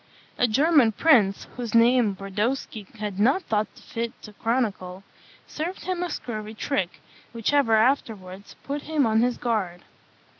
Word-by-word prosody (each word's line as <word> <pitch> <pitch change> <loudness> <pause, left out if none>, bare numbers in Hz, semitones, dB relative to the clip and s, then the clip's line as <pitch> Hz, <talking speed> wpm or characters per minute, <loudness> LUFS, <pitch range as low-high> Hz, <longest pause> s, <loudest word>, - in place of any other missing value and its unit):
A 245 - +4
German 270 0 +4
prince, 215 -9 +3
whose 235 -3 -4
name 230 -3 +4
Brodowski 205 +2 -3
has 205 -2 -5
not 265 - +3
thought 215 -1 0
fit 230 0 -5
to 210 - -11
chronicle, 200 -6 -2 0.4
served 340 +5 -5
him 370 -1 -2
a 355 - -2
scurvy 215 -7 -6
trick, 215 -7 -2 0.3
which 230 +4 -1
ever 275 -6 +4
afterwards 215 -5 -1
put 285 +1 -4
him 305 -3 0
on 220 0 +3
his 245 0 +1
guard. 200 -7 -2
230 Hz, 145 wpm, -25 LUFS, 210-270 Hz, 0.4 s, A